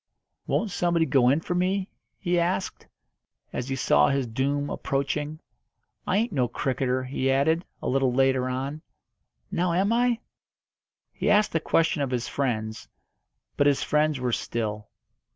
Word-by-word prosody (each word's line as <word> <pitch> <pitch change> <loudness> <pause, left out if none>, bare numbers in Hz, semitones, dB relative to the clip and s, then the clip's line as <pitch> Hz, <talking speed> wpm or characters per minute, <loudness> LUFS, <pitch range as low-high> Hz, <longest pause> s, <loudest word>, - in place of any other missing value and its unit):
"Won't 220 -3 0
somebody 170 -2 +1
go 130 -5 +4
in 145 +5 +2
for 175 - -3
me?" 185 +2 0 0.3
he 175 -2 0
asked, 185 +2 -2 0.7
as 125 +2 -3
he 135 - -1
saw 135 - +4
his 135 -2 +1
doom 140 +5 -1
approaching. 145 +3 -2 0.7
"I 190 - +2
ain't 230 +3 +1
no 130 -4 +2
cricketer," 130 -1 -1
he 130 +1 -1
added, 160 +6 +2 0.2
a - - -2
little 135 -1 +2
later 130 0 +2
on. 135 +4 -3 0.7
"Now 175 0 +1
am 195 +5 +2
I?" 240 0 +2 1.0
He - - -1
asked 210 0 +4
the 165 - +1
question 160 -1 +1
of 140 - 0
his 120 -2 -2
friends, 110 -5 -2 0.7
but 145 - +4
his 140 -1 +2
friends 150 -2 +1
were 125 -1 -1
still. 105 -3 -3
140 Hz, 150 wpm, -26 LUFS, 130-170 Hz, 1.0 s, go